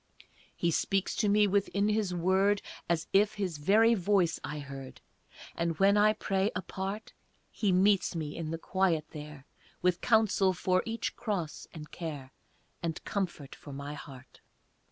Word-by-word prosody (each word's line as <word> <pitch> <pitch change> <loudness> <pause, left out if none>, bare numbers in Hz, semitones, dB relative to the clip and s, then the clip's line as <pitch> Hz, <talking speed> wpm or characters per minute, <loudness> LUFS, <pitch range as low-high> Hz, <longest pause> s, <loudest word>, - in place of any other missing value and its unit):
He 170 - +1
speaks 195 +3 0
to 210 - +2
me 210 +1 +5
within 200 0 +1
His 210 -3 +1
word 190 +3 +2 0.3
As 165 -1 +1
if 205 +2 +4
His 185 -7 -3
very 220 +9 +5
voice 190 -4 +2
I 150 - -4
heard, 135 -2 -8 0.6
And 170 -1 -1
when 200 +1 +5
I 210 +1 +5
pray, 195 -1 0
apart, 195 +3 -5 0.4
He 205 -3 0
meets 190 0 +3
me 155 -3 -4
in 165 -2 -4
the 165 - -2
quiet 170 -3 +1
there 150 -2 -9 0.4
With 180 -1 +2
counsel 215 -4 +3
for 185 0 +1
each 225 +1 -3
cross 190 -9 -3
and 155 -2 -10
care, 145 -6 -6 0.5
And 165 -2 -3
comfort 175 -9 -3
for 145 - -11
my 140 +2 -6
heart. 135 -3 -12
185 Hz, 155 wpm, -30 LUFS, 160-200 Hz, 0.6 s, me